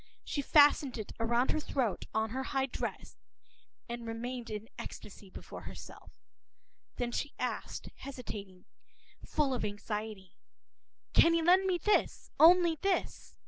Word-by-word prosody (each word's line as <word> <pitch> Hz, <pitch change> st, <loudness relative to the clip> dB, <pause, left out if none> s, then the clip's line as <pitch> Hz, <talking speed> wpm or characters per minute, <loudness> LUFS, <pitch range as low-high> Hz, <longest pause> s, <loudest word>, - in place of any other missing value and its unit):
She 285 Hz, -, -2 dB
fastened 290 Hz, -2 st, +5 dB
it 215 Hz, -, -6 dB
round 235 Hz, +3 st, +2 dB
her -, -, 0 dB
throat, 255 Hz, -8 st, -1 dB
on 220 Hz, 0 st, 0 dB
her 260 Hz, +3 st, -2 dB
high 265 Hz, 0 st, 0 dB
dress, 270 Hz, -, -6 dB, 0.7 s
and 235 Hz, -1 st, -6 dB
remained 240 Hz, +1 st, -5 dB
in 215 Hz, +1 st, -5 dB
ecstasy 200 Hz, -1 st, -9 dB
before -, -, -9 dB
herself. -, -, -11 dB, 0.8 s
Then, 240 Hz, -1 st, -2 dB
she 290 Hz, -, -3 dB
asked, -, -, -4 dB
hesitating, 210 Hz, -9 st, -8 dB, 0.6 s
full 285 Hz, -3 st, 0 dB
of 250 Hz, -, -2 dB
anxiety:— 210 Hz, -1 st, -5 dB, 0.7 s
“Can 335 Hz, 0 st, +6 dB
you 330 Hz, -, +1 dB
lend 370 Hz, +3 st, +5 dB
me 365 Hz, -2 st, +2 dB
this, 420 Hz, +5 st, +1 dB
only 340 Hz, -1 st, +7 dB
this? 390 Hz, -1 st, -1 dB
250 Hz, 135 wpm, -32 LUFS, 220-300 Hz, 0.8 s, only